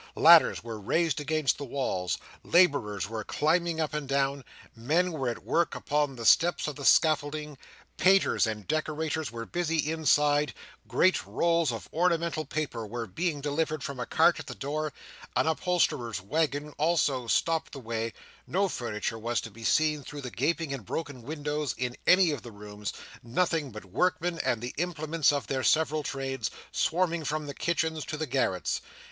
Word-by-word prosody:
Ladders -, -, +7 dB
were 115 Hz, -2 st, -6 dB
raised 155 Hz, -, 0 dB
against 150 Hz, -2 st, 0 dB
the -, -, -4 dB
walls; 120 Hz, -10 st, -2 dB, 0.3 s
labourers 140 Hz, -, +3 dB
were 110 Hz, 0 st, -4 dB
climbing 165 Hz, +6 st, +1 dB
up 155 Hz, -2 st, -1 dB
and 150 Hz, -3 st, -4 dB
down; 140 Hz, 0 st, 0 dB, 0.3 s
men 160 Hz, +11 st, +1 dB
were 135 Hz, -6 st, -2 dB
at 120 Hz, -, -6 dB
work 170 Hz, 0 st, +1 dB
upon 145 Hz, -2 st, 0 dB
the 115 Hz, -2 st, -7 dB
steps 165 Hz, +5 st, +4 dB
of 150 Hz, -, -4 dB
the 140 Hz, -, -7 dB
scaffolding; 150 Hz, -1 st, +3 dB, 0.4 s
painters 190 Hz, -8 st, +4 dB
and 105 Hz, -2 st, -5 dB
decorators 155 Hz, -1 st, -1 dB
were 115 Hz, 0 st, -6 dB
busy 165 Hz, +1 st, -1 dB
inside; 150 Hz, -2 st, +2 dB, 0.3 s
great 185 Hz, +1 st, +3 dB
rolls 170 Hz, -4 st, +2 dB
of 115 Hz, -2 st, -6 dB
ornamental 170 Hz, -2 st, +1 dB
paper 140 Hz, -5 st, -3 dB
were 115 Hz, +2 st, -4 dB
being 155 Hz, -, -2 dB
delivered 150 Hz, 0 st, -1 dB
from 140 Hz, -2 st, -5 dB
a 125 Hz, -, -3 dB
cart 165 Hz, +1 st, +4 dB
at 160 Hz, -, -8 dB
the -, -, -6 dB
door; 150 Hz, +2 st, -3 dB, 0.4 s
an -, -, +3 dB
upholsterer's 155 Hz, -, 0 dB
waggon 150 Hz, -, -1 dB
also 145 Hz, -6 st, +1 dB
stopped 165 Hz, +7 st, +1 dB
the 140 Hz, -, -7 dB
way; 115 Hz, -1 st, -3 dB, 0.4 s
no 195 Hz, +2 st, +1 dB
furniture 115 Hz, -, -3 dB
was 120 Hz, +2 st, -1 dB
to 115 Hz, -, -7 dB
be 115 Hz, +3 st, -12 dB
seen 155 Hz, +4 st, +2 dB
through 145 Hz, +1 st, -8 dB
the 125 Hz, -2 st, -6 dB
gaping 155 Hz, +4 st, -1 dB
and 135 Hz, -5 st, -5 dB
broken 140 Hz, -, -5 dB
windows 150 Hz, +1 st, -3 dB
in 125 Hz, 0 st, -2 dB
any 180 Hz, -2 st, +6 dB
of 145 Hz, -5 st, -4 dB
the 120 Hz, -, -10 dB
rooms; 105 Hz, 0 st, -7 dB, 0.3 s
nothing 155 Hz, +4 st, 0 dB
but 105 Hz, -3 st, -9 dB
workmen, 175 Hz, -, 0 dB
and 125 Hz, -6 st, 0 dB
the 120 Hz, +1 st, -5 dB
implements 160 Hz, -2 st, +1 dB
of 145 Hz, -1 st, -2 dB
their 135 Hz, -1 st, -2 dB
several 155 Hz, +1 st, +2 dB
trades, 135 Hz, -2 st, -3 dB, 0.2 s
swarming 170 Hz, 0 st, +1 dB
from 155 Hz, +1 st, -2 dB
the 140 Hz, -, -6 dB
kitchens 160 Hz, -1 st, -1 dB
to 155 Hz, -, -5 dB
the 155 Hz, -, -2 dB
garrets. 120 Hz, -, 0 dB
150 Hz, 170 wpm, -28 LUFS, 125-160 Hz, 0.4 s, Ladders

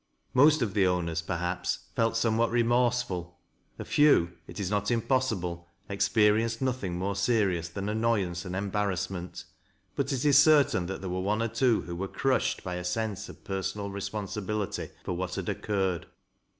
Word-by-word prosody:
Most 145 Hz, +2 st, +5 dB
of 105 Hz, -4 st, -2 dB
the 95 Hz, -2 st, +3 dB
owners, 85 Hz, -2 st, 0 dB
perhaps, 90 Hz, +2 st, -2 dB, 0.2 s
felt 115 Hz, 0 st, +1 dB
somewhat 115 Hz, 0 st, +2 dB
remorseful; 120 Hz, -7 st, +1 dB, 0.4 s
a -, -, -6 dB
few, 145 Hz, -, +4 dB, 0.2 s
it -, -, -8 dB
is 100 Hz, -1 st, -2 dB
not 105 Hz, 0 st, 0 dB
impossible, 110 Hz, -8 st, 0 dB, 0.2 s
ex 100 Hz, 0 st, 0 dB
perienced 110 Hz, +1 st, +3 dB
nothing 125 Hz, -9 st, -2 dB
more 95 Hz, +2 st, -2 dB
serious 100 Hz, -5 st, +1 dB
than 100 Hz, +4 st, -5 dB
annoyance 105 Hz, -6 st, 0 dB
and 90 Hz, 0 st, -5 dB
embarrassment, 95 Hz, -2 st, -2 dB, 0.5 s
but 140 Hz, -, -1 dB
it 135 Hz, 0 st, -1 dB
is 140 Hz, -2 st, +7 dB
certain 140 Hz, -, +4 dB
that 95 Hz, 0 st, -5 dB
there 95 Hz, -, -4 dB
were 90 Hz, -, -2 dB
one 105 Hz, +4 st, 0 dB
or 115 Hz, -, -1 dB
twc 120 Hz, -1 st, +2 dB
who 85 Hz, -, -5 dB
were 95 Hz, +3 st, -3 dB
crushed 135 Hz, +5 st, 0 dB
by 90 Hz, -1 st, -4 dB
a 90 Hz, -, -5 dB
sense 105 Hz, +3 st, -2 dB
of -, -, -13 dB
personal 95 Hz, +1 st, -3 dB
responsibility 105 Hz, 0 st, -3 dB, 0.2 s
foi -, -, -3 dB
what 90 Hz, +1 st, -3 dB
had 95 Hz, -3 st, -4 dB
occurred. 95 Hz, -5 st, -1 dB
100 Hz, 165 wpm, -28 LUFS, 90-115 Hz, 0.5 s, is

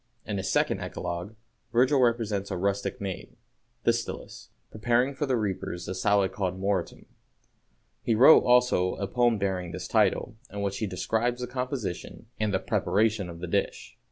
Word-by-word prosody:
In 105 Hz, -, -3 dB
his 95 Hz, -, -2 dB
second -, -, +1 dB
Eclogue, 90 Hz, +6 st, -5 dB, 0.4 s
Virgil 130 Hz, +4 st, +4 dB
represents 110 Hz, -5 st, +1 dB
a 95 Hz, -, -3 dB
rustic 100 Hz, +6 st, -1 dB
maid, 95 Hz, -3 st, -6 dB, 0.5 s
Thestylis, -, -, -2 dB, 0.2 s
preparing 120 Hz, +5 st, +1 dB
for 145 Hz, +2 st, -2 dB
the 130 Hz, -2 st, +1 dB
reapers 95 Hz, -4 st, -3 dB
a 95 Hz, -, -3 dB
salad 95 Hz, 0 st, +2 dB
called 95 Hz, -1 st, -3 dB
moretum. 95 Hz, -2 st, -2 dB, 1.0 s
He 115 Hz, -, +1 dB
wrote, 130 Hz, +8 st, +8 dB
also, 125 Hz, -7 st, +3 dB
a 100 Hz, -, -3 dB
poem 120 Hz, +1 st, +2 dB
bearing 95 Hz, -3 st, -2 dB
this -, -, -5 dB
title, -, -, +1 dB
in 100 Hz, 0 st, -4 dB
which 100 Hz, -1 st, -2 dB
he 110 Hz, -, -1 dB
describes 115 Hz, +6 st, -1 dB
the -, -, -1 dB
composition 125 Hz, -7 st, -5 dB
and 105 Hz, -1 st, 0 dB
preparation 105 Hz, -2 st, +1 dB
of 85 Hz, 0 st, -9 dB
the 90 Hz, -, -4 dB
dish. -, -, -2 dB
105 Hz, 155 wpm, -27 LUFS, 95-120 Hz, 1.0 s, wrote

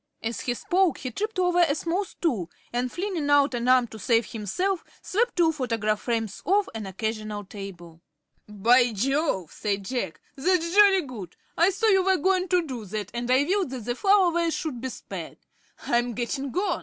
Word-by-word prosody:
As 225 Hz, -3 st, -3 dB
he 245 Hz, -, -1 dB
spoke 360 Hz, +2 st, +1 dB
he 255 Hz, -, -5 dB
tripped 430 Hz, -, -3 dB
over 360 Hz, -1 st, +2 dB
a 325 Hz, -5 st, +4 dB
small 345 Hz, +5 st, -1 dB
stool 235 Hz, -, -2 dB, 0.2 s
and, 245 Hz, +1 st, -1 dB
flinging 350 Hz, -6 st, -2 dB
out 285 Hz, -1 st, +4 dB
an 240 Hz, 0 st, -2 dB
arm 255 Hz, -1 st, +5 dB
to 220 Hz, -, -10 dB
save 230 Hz, +2 st, +2 dB
himself, 345 Hz, -, -2 dB, 0.2 s
swept 475 Hz, +5 st, 0 dB
two 335 Hz, -2 st, +4 dB
photograph 225 Hz, -7 st, -1 dB
frames 225 Hz, -4 st, -2 dB
off 400 Hz, +1 st, +2 dB
an 220 Hz, -3 st, -5 dB
occasional 215 Hz, +1 st, -4 dB
table. 180 Hz, -5 st, -10 dB, 0.5 s
"By 235 Hz, +4 st, +3 dB
Jove," 260 Hz, -, 0 dB
said 200 Hz, -2 st, -2 dB
Jack, 215 Hz, -8 st, -3 dB, 0.2 s
"that's 335 Hz, +3 st, +1 dB
jolly 400 Hz, -2 st, +6 dB
good. 220 Hz, -, -9 dB, 0.2 s
I 340 Hz, +3 st, +4 dB
saw 395 Hz, +4 st, -1 dB
you 385 Hz, -3 st, +5 dB
were 380 Hz, 0 st, +3 dB
going 370 Hz, +3 st, +1 dB
to 360 Hz, -2 st, +2 dB
do 255 Hz, -6 st, -6 dB
that, 205 Hz, 0 st, -5 dB
and 240 Hz, 0 st, -3 dB
I 260 Hz, +2 st, +4 dB
willed 380 Hz, +1 st, 0 dB
that 250 Hz, -4 st, -6 dB
the 240 Hz, -, -1 dB
flower 390 Hz, +4 st, +4 dB
vase 335 Hz, -1 st, 0 dB
should 275 Hz, -8 st, -4 dB
be 260 Hz, -, -3 dB
spared. -, -, -8 dB, 0.5 s
I'm 240 Hz, -1 st, +1 dB
getting 270 Hz, +3 st, -3 dB
on." 380 Hz, -1 st, 0 dB
260 Hz, 190 wpm, -26 LUFS, 220-360 Hz, 0.5 s, jolly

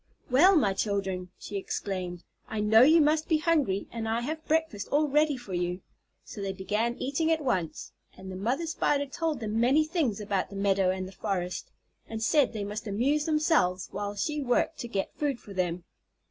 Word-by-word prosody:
"Well, 355 Hz, +10 st, +6 dB
my 210 Hz, -, +3 dB
children," 195 Hz, -2 st, -2 dB
she 205 Hz, -, -6 dB
exclaimed, 185 Hz, -2 st, -4 dB, 0.2 s
"I 220 Hz, -, -4 dB
know 215 Hz, +2 st, +5 dB
you 315 Hz, +6 st, +7 dB
must 310 Hz, +1 st, +3 dB
be 320 Hz, -, +3 dB
hungry, 300 Hz, -, +1 dB
and 225 Hz, -1 st, -4 dB
I 230 Hz, +1 st, 0 dB
have 310 Hz, +5 st, -4 dB
breakfast 315 Hz, -10 st, 0 dB
all 300 Hz, +1 st, +2 dB
ready 295 Hz, 0 st, +2 dB
for 245 Hz, -6 st, -9 dB
you." 180 Hz, +1 st, -2 dB, 0.4 s
So 205 Hz, -, -9 dB
they 195 Hz, -1 st, -2 dB
began 210 Hz, +5 st, -1 dB
eating 315 Hz, +5 st, 0 dB
at 320 Hz, -2 st, +1 dB
once, 185 Hz, -, -2 dB, 0.3 s
and 190 Hz, 0 st, -8 dB
the -, -, -6 dB
mother 240 Hz, -, -1 dB
Spider 290 Hz, -3 st, +1 dB
told 300 Hz, -1 st, -2 dB
them 220 Hz, 0 st, -1 dB
many 270 Hz, +6 st, +4 dB
things 310 Hz, -, 0 dB
about 200 Hz, -2 st, -1 dB
the 200 Hz, -, -10 dB
meadow 195 Hz, -1 st, +2 dB
and 185 Hz, 0 st, -2 dB
the -, -, -10 dB
forest, 185 Hz, -3 st, -3 dB, 0.4 s
and 225 Hz, 0 st, -4 dB
said 285 Hz, +2 st, +3 dB
they 215 Hz, -3 st, -4 dB
must 210 Hz, +2 st, -5 dB
amuse 270 Hz, +9 st, +1 dB
themselves 305 Hz, -, +2 dB
while 205 Hz, +1 st, -4 dB
she 295 Hz, +9 st, -2 dB
worked 265 Hz, +5 st, 0 dB
to 240 Hz, -, -4 dB
get 200 Hz, -4 st, -3 dB
food 280 Hz, -5 st, -2 dB
for 200 Hz, -, -11 dB
them. 180 Hz, -2 st, -1 dB
225 Hz, 195 wpm, -28 LUFS, 195-300 Hz, 0.4 s, you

